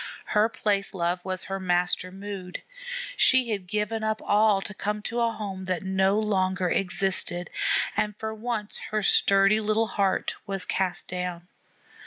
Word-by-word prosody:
Her 215 Hz, +1 st, +2 dB
place 200 Hz, -3 st, -1 dB
love 175 Hz, 0 st, -1 dB
was 185 Hz, -1 st, +1 dB
her 195 Hz, 0 st, -4 dB
master 180 Hz, 0 st, 0 dB
mood. 195 Hz, -1 st, -7 dB, 0.5 s
She 255 Hz, -, +5 dB
had 195 Hz, -4 st, -3 dB
given 210 Hz, +2 st, -2 dB
up 220 Hz, 0 st, 0 dB
all 210 Hz, -1 st, +4 dB
to 210 Hz, +2 st, -6 dB
come 210 Hz, +2 st, -3 dB
to 235 Hz, +2 st, -2 dB
a 230 Hz, -1 st, +2 dB
home 195 Hz, -4 st, -6 dB
that 185 Hz, -2 st, -2 dB
no 190 Hz, +1 st, +2 dB
longer 185 Hz, -4 st, 0 dB
existed, 180 Hz, -1 st, +1 dB, 0.4 s
and 210 Hz, -1 st, -1 dB
for 220 Hz, 0 st, -4 dB
once 220 Hz, -1 st, -3 dB
her 215 Hz, -1 st, -1 dB
sturdy 195 Hz, +1 st, +5 dB
little 215 Hz, +1 st, +1 dB
heart 200 Hz, -4 st, 0 dB
was 195 Hz, -2 st, 0 dB
cast 185 Hz, -2 st, -1 dB
down. 180 Hz, -1 st, -4 dB
195 Hz, 155 wpm, -26 LUFS, 185-215 Hz, 0.5 s, She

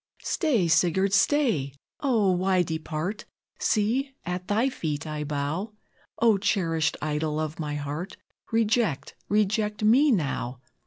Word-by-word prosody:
"Stay! 250 Hz, -, +1 dB
Sigurd, 185 Hz, +4 st, +2 dB
stay! 200 Hz, -, +2 dB, 0.2 s
O, 225 Hz, -9 st, +2 dB
why 185 Hz, 0 st, +2 dB
depart? 160 Hz, +5 st, -4 dB, 0.3 s
See, 250 Hz, +6 st, 0 dB
at 180 Hz, +1 st, -4 dB
thy 220 Hz, +5 st, +2 dB
feet 155 Hz, -, -3 dB
I 150 Hz, -1 st, -4 dB
bow; 150 Hz, +8 st, -3 dB, 0.4 s
O, 225 Hz, -4 st, +4 dB
cherished 165 Hz, -6 st, 0 dB
idol 155 Hz, 0 st, -1 dB
of 155 Hz, 0 st, -4 dB
my 150 Hz, -2 st, -3 dB
heart, 150 Hz, +7 st, -5 dB, 0.3 s
Reject 225 Hz, -, +1 dB, 0.2 s
reject 210 Hz, +1 st, +1 dB
me 255 Hz, +8 st, +5 dB
now!" 140 Hz, -, -1 dB
185 Hz, 120 wpm, -26 LUFS, 155-215 Hz, 0.4 s, me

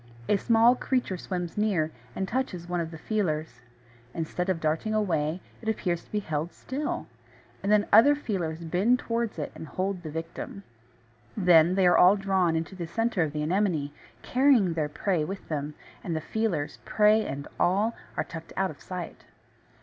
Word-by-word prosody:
A -, -, +4 dB
small 230 Hz, +3 st, +5 dB
creature 255 Hz, -6 st, -1 dB
swims 180 Hz, 0 st, -4 dB
near, 180 Hz, -8 st, +1 dB, 0.2 s
and 190 Hz, -, -2 dB
touches 190 Hz, -9 st, -2 dB
one 175 Hz, 0 st, -1 dB
of 165 Hz, -, -4 dB
the 160 Hz, -, -9 dB
feelers. 155 Hz, -, -2 dB, 0.5 s
Instead 175 Hz, +3 st, -2 dB
of 185 Hz, -3 st, +1 dB
darting 160 Hz, +8 st, 0 dB
away, 170 Hz, -5 st, 0 dB, 0.2 s
it 220 Hz, -, -2 dB
appears 180 Hz, -6 st, -1 dB
to -, -, -25 dB
be 210 Hz, -, -1 dB
held 160 Hz, -1 st, -3 dB
still; 285 Hz, +3 st, -4 dB, 0.6 s
and 200 Hz, -, 0 dB
then 210 Hz, -1 st, +5 dB
other 240 Hz, +7 st, +8 dB
feelers 175 Hz, -, -3 dB
bend 190 Hz, +9 st, +2 dB
towards 230 Hz, -4 st, -2 dB
it 150 Hz, -, -4 dB
and 160 Hz, -, -9 dB
hold 185 Hz, +1 st, -2 dB
the 160 Hz, -, -6 dB
victim. 165 Hz, +5 st, -6 dB, 0.7 s
Then 175 Hz, -2 st, +5 dB
they 190 Hz, -1 st, +3 dB
are 175 Hz, -, +5 dB
all 185 Hz, +3 st, +7 dB
drawn 185 Hz, -5 st, +1 dB
to 190 Hz, -, -13 dB
the 175 Hz, -3 st, -5 dB
centre 225 Hz, +2 st, 0 dB
of 155 Hz, -2 st, +1 dB
the 150 Hz, 0 st, -2 dB
Anemone, 165 Hz, -4 st, 0 dB, 0.3 s
carrying 250 Hz, -9 st, +4 dB
their 155 Hz, -2 st, -1 dB
prey 170 Hz, +1 st, 0 dB
with 190 Hz, +5 st, -6 dB
them; 150 Hz, -1 st, -3 dB, 0.3 s
and 170 Hz, -, -2 dB
the -, -, 0 dB
feelers, 180 Hz, -6 st, -2 dB
prey 215 Hz, +1 st, +4 dB
and 140 Hz, -5 st, -5 dB
all, 205 Hz, +6 st, +2 dB, 0.2 s
are -, -, +1 dB
tucked 165 Hz, -1 st, -9 dB
out 190 Hz, 0 st, +1 dB
of 145 Hz, -, -15 dB
sight. 180 Hz, -2 st, -7 dB
180 Hz, 180 wpm, -27 LUFS, 160-210 Hz, 0.7 s, other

